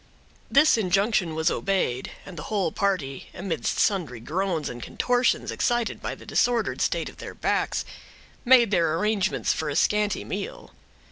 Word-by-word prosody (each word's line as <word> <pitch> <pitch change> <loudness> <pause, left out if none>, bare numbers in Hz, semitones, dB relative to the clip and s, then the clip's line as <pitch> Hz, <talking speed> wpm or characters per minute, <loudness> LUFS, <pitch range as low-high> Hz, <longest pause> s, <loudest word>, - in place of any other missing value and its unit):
This 280 -4 +5
injunction 195 -3 +1
was 160 +1 +2
obeyed, 185 -11 -1
and 185 - -10
the 155 - -6
whole 195 -6 0
party, 180 -10 -2
amidst 170 -8 -2
sundry 170 - +1
groans 165 - -2
and 120 0 -6
contortions, 245 - +1
excited 240 -1 0
by - - -4
the - - -14
disordered 240 -2 +1
state - - 0
of - - -10
their - - -8
backs, - - 0 0.6
made 240 -4 +6
their 165 -4 +2
arrangements 210 +1 +1
for 155 - -3
a 145 - -3
scanty 210 0 +1
meal. - - -6
195 Hz, 150 wpm, -25 LUFS, 160-220 Hz, 0.6 s, made